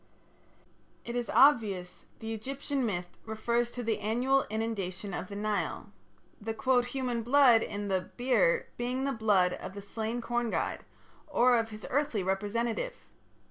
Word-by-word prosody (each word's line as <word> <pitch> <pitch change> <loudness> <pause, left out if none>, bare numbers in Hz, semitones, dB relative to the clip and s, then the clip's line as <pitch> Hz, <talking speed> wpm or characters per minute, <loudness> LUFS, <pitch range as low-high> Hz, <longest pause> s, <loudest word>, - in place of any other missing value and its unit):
" - - -35
It 235 - -5
is 245 -1 -2
obvious 205 -10 +4
that - - -32
the 225 0 -4
Egyptian 270 +4 -3
myth 175 -3 -4
refers 235 +2 0
to 245 0 -6
the 220 -2 0
annual 245 +6 +1
inundation 205 -3 -3
of 185 - -4
the 200 - -8
Nile, 205 - -2 0.5
the 220 +1 -3 0.3
"human 250 -3 -2
blood" 245 -1 +6
in 205 -1 -4
the 190 -2 +1 0.2
"beer" 470 - +2
being 250 +2 -1
the 275 - 0
blood 205 -7 +3
of 190 - -7
the 200 - -6
slain 225 +3 -3
corn 240 0 -1
god, - - -1 0.5
or 250 -4 +4
of 225 0 -2
his 215 -1 -9
earthly 270 -8 +1
representative. 225 - -1
225 Hz, 155 wpm, -30 LUFS, 205-250 Hz, 0.5 s, blood